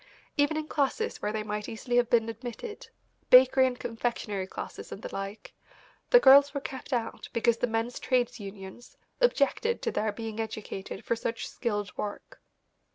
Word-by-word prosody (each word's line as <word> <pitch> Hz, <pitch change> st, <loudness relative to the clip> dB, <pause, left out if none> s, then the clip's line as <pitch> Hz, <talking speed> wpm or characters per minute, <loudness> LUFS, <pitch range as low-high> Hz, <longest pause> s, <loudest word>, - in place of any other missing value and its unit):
Even 290 Hz, +1 st, +2 dB
in 310 Hz, 0 st, -3 dB
classes 310 Hz, -, -1 dB
where 210 Hz, -, -1 dB
they 215 Hz, 0 st, -2 dB
might 210 Hz, 0 st, -4 dB
easily 240 Hz, +2 st, -2 dB
have 245 Hz, -1 st, +3 dB
been 230 Hz, -2 st, +3 dB
admitted, 245 Hz, -, -7 dB, 0.4 s
bakery 260 Hz, +1 st, +7 dB
and 250 Hz, -1 st, -4 dB
confectionery 225 Hz, -4 st, -3 dB
classes -, -, -8 dB
and 200 Hz, -, -8 dB
the -, -, -6 dB
like, 195 Hz, +2 st, -6 dB, 0.6 s
the -, -, +8 dB
girls 280 Hz, -, +7 dB
were -, -, 0 dB
kept 265 Hz, 0 st, -8 dB
out 235 Hz, -3 st, -2 dB
because 235 Hz, -1 st, +2 dB
the 245 Hz, -, 0 dB
men's 225 Hz, +1 st, -2 dB
trades 250 Hz, -2 st, 0 dB
unions 195 Hz, +3 st, -10 dB, 0.2 s
objected 470 Hz, -, +2 dB
to -, -, 0 dB
their 215 Hz, 0 st, 0 dB
being 225 Hz, 0 st, -6 dB
educated 215 Hz, -3 st, -5 dB
for 235 Hz, -, +1 dB
such 230 Hz, 0 st, -3 dB
skilled 205 Hz, -4 st, -3 dB
work. 205 Hz, -1 st, -6 dB
235 Hz, 165 wpm, -29 LUFS, 215-260 Hz, 0.6 s, the